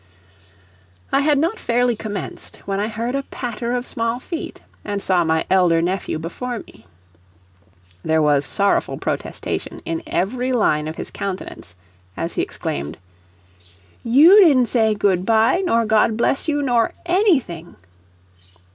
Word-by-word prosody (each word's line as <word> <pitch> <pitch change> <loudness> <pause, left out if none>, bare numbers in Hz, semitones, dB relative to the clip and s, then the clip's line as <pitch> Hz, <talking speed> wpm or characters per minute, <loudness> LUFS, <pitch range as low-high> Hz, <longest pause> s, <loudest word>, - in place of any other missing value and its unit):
I 275 - +3
had 295 0 +3
not 330 +10 0
fairly 240 0 +1
commenced 205 -3 -7
when 195 0 -2
I 210 - 0
heard 230 +3 -3
a 275 - 0
patter 240 -2 -4
of 245 0 -2
small 230 0 -2
feet, 330 +5 -6 0.2
and 205 -1 -3
saw 180 -2 +2
my 160 0 0
elder 180 -3 +3
nephew 175 -1 -2
before 235 +10 -5
me. 145 - -13 1.2
There 160 0 +2
was 145 -2 +3
sorrowful 200 +5 0
protestation - - -4
in 165 0 -3
every 250 +7 -1
line 150 -10 +1
of 155 - -5
his - - -7
countenance, 190 - -6 0.4
as - - -3
he - - -1
exclaimed: 75 +3 -4 1.1
"You 315 - +7
didn't 260 -8 +4
say 220 -3 +2
'Good 190 -3 +1
by' 225 - +3
nor 230 -10 +2
'God 220 0 +2
bless 270 +6 0
you' 290 -2 0
nor 240 -4 +1
anything." 310 - +1
225 Hz, 140 wpm, -20 LUFS, 185-250 Hz, 1.2 s, You